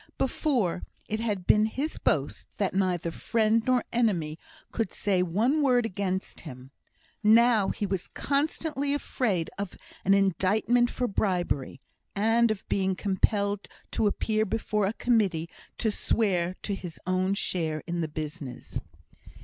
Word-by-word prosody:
Before, 250 Hz, -, 0 dB, 0.3 s
it 215 Hz, -, -2 dB
had 210 Hz, -5 st, -2 dB
been 210 Hz, +3 st, +5 dB
his 280 Hz, +8 st, -3 dB
boast -, -, -1 dB
that 200 Hz, -2 st, 0 dB
neither 180 Hz, -3 st, 0 dB
friend 220 Hz, +4 st, +2 dB
nor 255 Hz, -2 st, +3 dB
enemy 175 Hz, -10 st, +1 dB, 0.3 s
could 225 Hz, -6 st, -1 dB
say 190 Hz, -3 st, +1 dB
one 220 Hz, -, +2 dB
word 250 Hz, -4 st, +3 dB
against 190 Hz, -2 st, -3 dB
him; 130 Hz, -3 st, -10 dB, 0.5 s
now, 220 Hz, -1 st, +5 dB
he 205 Hz, -, -2 dB
was 195 Hz, -2 st, -2 dB
constantly 285 Hz, 0 st, -1 dB
afraid 210 Hz, -, -1 dB
of 200 Hz, -2 st, -4 dB, 0.3 s
an 195 Hz, +1 st, +5 dB
indictment 200 Hz, +6 st, +2 dB
for 250 Hz, -, -1 dB
bribery, 175 Hz, -, -1 dB, 0.4 s
and 225 Hz, +3 st, +3 dB
of 215 Hz, -3 st, -3 dB
being 190 Hz, -1 st, +1 dB
compelled 200 Hz, +1 st, 0 dB, 0.2 s
to 215 Hz, -, +2 dB
appear 215 Hz, +1 st, +1 dB
before 210 Hz, -1 st, 0 dB
a 205 Hz, -, -1 dB
Committee 200 Hz, -10 st, +1 dB, 0.3 s
to 220 Hz, -, +1 dB
swear 185 Hz, -5 st, +1 dB
to 205 Hz, -, -2 dB
his 175 Hz, -4 st, -6 dB
own 185 Hz, +2 st, +1 dB
share 160 Hz, -6 st, -1 dB
in 175 Hz, 0 st, -2 dB
the 160 Hz, -, -1 dB
business. 150 Hz, -4 st, -6 dB
200 Hz, 140 wpm, -28 LUFS, 180-225 Hz, 0.5 s, been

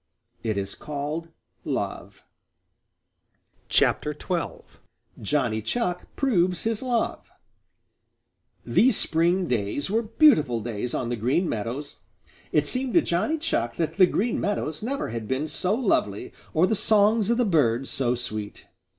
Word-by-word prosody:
It 110 Hz, -3 st, -2 dB
is 100 Hz, 0 st, -3 dB
called 150 Hz, +3 st, -5 dB, 0.4 s
love. -, -, -4 dB, 1.5 s
XII. -, -, +5 dB, 1.3 s
JOHNNY 110 Hz, -3 st, 0 dB
CHUCK 180 Hz, -, -3 dB
PROVES 185 Hz, -, +1 dB
HIS 225 Hz, -1 st, -1 dB
LOVE 245 Hz, -3 st, -2 dB, 1.4 s
These 250 Hz, -3 st, +4 dB
spring 170 Hz, +3 st, +2 dB
days 120 Hz, -, -1 dB
were 225 Hz, +2 st, +2 dB
beautiful 215 Hz, -, +4 dB
days 115 Hz, +1 st, -4 dB
on 120 Hz, -, -2 dB
the 120 Hz, -, -1 dB
Green 130 Hz, -, 0 dB
Meadows. 115 Hz, +6 st, -4 dB, 0.5 s
It 150 Hz, -, +2 dB
seemed 255 Hz, -, 0 dB
to 340 Hz, -, +7 dB
Johnny 205 Hz, -, 0 dB
Chuck 205 Hz, -, -1 dB
that 160 Hz, 0 st, -2 dB
the 185 Hz, -2 st, +7 dB
Green 225 Hz, +6 st, -1 dB
Meadows 175 Hz, -7 st, -2 dB
never 265 Hz, +6 st, -3 dB
had 110 Hz, -1 st, -5 dB
been 135 Hz, +6 st, -1 dB
so 185 Hz, +6 st, 0 dB
lovely 190 Hz, -, 0 dB, 0.2 s
or 160 Hz, +3 st, +3 dB
the 220 Hz, -, 0 dB
songs 215 Hz, 0 st, +3 dB
of 235 Hz, -, +2 dB
the 245 Hz, -, +2 dB
birds 135 Hz, -, +2 dB
so 125 Hz, -2 st, +1 dB
sweet. 110 Hz, -4 st, -5 dB
165 Hz, 135 wpm, -25 LUFS, -, 1.5 s, to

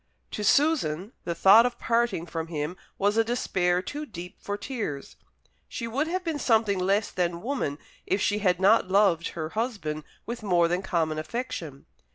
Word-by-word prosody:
To 210 Hz, -, -4 dB
Susan 215 Hz, -, +2 dB
the 170 Hz, -, -2 dB
thought 200 Hz, +6 st, +7 dB
of 245 Hz, -1 st, -1 dB
parting 230 Hz, -7 st, 0 dB
from 165 Hz, -1 st, -4 dB
him 155 Hz, +1 st, -3 dB, 0.2 s
was 205 Hz, +2 st, +1 dB
a 225 Hz, -, +5 dB
despair 185 Hz, -6 st, 0 dB
too 295 Hz, +8 st, -5 dB
deep 180 Hz, -5 st, -9 dB
for 205 Hz, 0 st, -4 dB
tears. 205 Hz, -, -5 dB, 0.5 s
She 230 Hz, -, -4 dB
would 275 Hz, +7 st, -1 dB
have 365 Hz, +2 st, -2 dB
been 325 Hz, -4 st, -2 dB
something 220 Hz, -6 st, +2 dB
less 200 Hz, +3 st, +1 dB
than 175 Hz, -1 st, -1 dB
woman 235 Hz, -, -2 dB, 0.3 s
if 190 Hz, -, +1 dB
she 205 Hz, +1 st, +1 dB
had 180 Hz, -3 st, +2 dB
not 195 Hz, 0 st, +4 dB
loved 190 Hz, -4 st, +3 dB
her 155 Hz, -1 st, -3 dB
husband 195 Hz, -9 st, -3 dB, 0.2 s
with 235 Hz, +1 st, -5 dB
more 175 Hz, -5 st, +3 dB
than 175 Hz, +2 st, 0 dB
common 165 Hz, -5 st, -1 dB
affection. 165 Hz, -, -5 dB
195 Hz, 175 wpm, -27 LUFS, 170-230 Hz, 0.5 s, thought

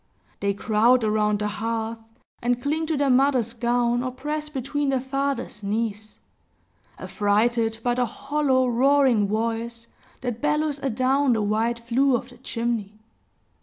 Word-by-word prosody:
They 200 Hz, 0 st, 0 dB
crowd 225 Hz, +4 st, +3 dB
around 210 Hz, -1 st, +2 dB
the 210 Hz, 0 st, -2 dB
hearth, 225 Hz, +1 st, -3 dB, 0.4 s
and 245 Hz, 0 st, +1 dB
cling 310 Hz, +4 st, -1 dB
to 315 Hz, -2 st, 0 dB
their 280 Hz, -1 st, +2 dB
mother's 250 Hz, -3 st, +3 dB
gown, 240 Hz, 0 st, +1 dB
or 255 Hz, -, -2 dB
press 300 Hz, +4 st, -4 dB
between 285 Hz, +1 st, -2 dB
their 265 Hz, -1 st, +1 dB
father's 275 Hz, -4 st, -3 dB
knees, 215 Hz, +1 st, -3 dB, 0.8 s
affrighted 225 Hz, +2 st, +1 dB
by 245 Hz, -, +2 dB
the 245 Hz, 0 st, 0 dB
hollow 275 Hz, +1 st, 0 dB
roaring 255 Hz, -3 st, +3 dB
voice, 230 Hz, +2 st, -2 dB, 0.4 s
that 245 Hz, -2 st, -4 dB
bellows 300 Hz, -1 st, 0 dB
a 275 Hz, -, -1 dB
down 260 Hz, +3 st, +2 dB
the 220 Hz, -2 st, 0 dB
wide 220 Hz, +3 st, 0 dB
flue 245 Hz, +3 st, +2 dB
of 245 Hz, +1 st, -4 dB
the 245 Hz, -1 st, -16 dB
chimney. 230 Hz, -4 st, -3 dB
240 Hz, 145 wpm, -24 LUFS, 225-270 Hz, 0.8 s, crowd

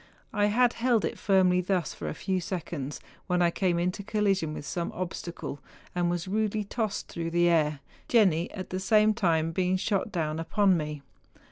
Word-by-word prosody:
I 205 Hz, -1 st, +3 dB
had 240 Hz, +3 st, +3 dB
held 235 Hz, -2 st, +2 dB
it -, -, -4 dB
firmly 185 Hz, -2 st, +3 dB
thus 180 Hz, -3 st, -1 dB
for -, -, -6 dB
a -, -, -5 dB
few 190 Hz, -2 st, -1 dB
seconds, 160 Hz, -6 st, -4 dB, 0.3 s
when 180 Hz, -1 st, +1 dB
I 170 Hz, -, +3 dB
came 180 Hz, -1 st, +1 dB
into 180 Hz, +3 st, -1 dB
collision 195 Hz, -5 st, 0 dB
with -, -, -7 dB
some 170 Hz, +2 st, -3 dB
obstacle, 170 Hz, -4 st, -5 dB, 0.3 s
and 175 Hz, -1 st, +1 dB
was 175 Hz, 0 st, -2 dB
rudely 215 Hz, +1 st, 0 dB
tossed 215 Hz, 0 st, -3 dB
through 165 Hz, 0 st, -4 dB
the 175 Hz, +1 st, +3 dB
air, 150 Hz, -4 st, +2 dB, 0.3 s
Jenni 185 Hz, -8 st, +3 dB
at 185 Hz, -2 st, -7 dB
the 185 Hz, -, -2 dB
same 215 Hz, +2 st, +4 dB
time 165 Hz, -5 st, +1 dB
being 185 Hz, +2 st, +1 dB
shot 200 Hz, +2 st, -1 dB
down 160 Hz, -3 st, -2 dB
upon 190 Hz, +3 st, +3 dB
me. 150 Hz, -3 st, -4 dB
180 Hz, 180 wpm, -28 LUFS, 170-205 Hz, 0.3 s, same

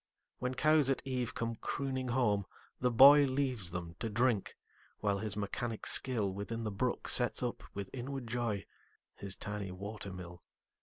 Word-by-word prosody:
When 125 Hz, +1 st, -2 dB
cows 155 Hz, -1 st, +4 dB
at 135 Hz, -, 0 dB
eve 125 Hz, -3 st, -2 dB
come 115 Hz, -1 st, -2 dB
crooning 130 Hz, 0 st, -3 dB
home, 105 Hz, -6 st, +1 dB, 0.3 s
the 125 Hz, 0 st, +2 dB
boyLeaves 135 Hz, -4 st, +6 dB
them 85 Hz, -1 st, -5 dB
to 115 Hz, -, -2 dB
drink, 115 Hz, -1 st, +1 dB, 0.4 s
while 100 Hz, -2 st, 0 dB
his 110 Hz, -1 st, -3 dB
mechanic 110 Hz, +2 st, -3 dB
skillWithin 110 Hz, -2 st, +1 dB
the 105 Hz, -, -2 dB
brook 120 Hz, +5 st, -1 dB
sets 125 Hz, 0 st, +2 dB
up, 120 Hz, -, -2 dB
with 100 Hz, -1 st, -5 dB
inward 135 Hz, 0 st, -5 dB
joy, 115 Hz, -4 st, -2 dB, 0.5 s
His 100 Hz, -2 st, -5 dB
tiny 105 Hz, -2 st, -4 dB
water 100 Hz, +2 st, -6 dB
mill. 90 Hz, -1 st, -9 dB
115 Hz, 150 wpm, -33 LUFS, 100-130 Hz, 0.5 s, boyLeaves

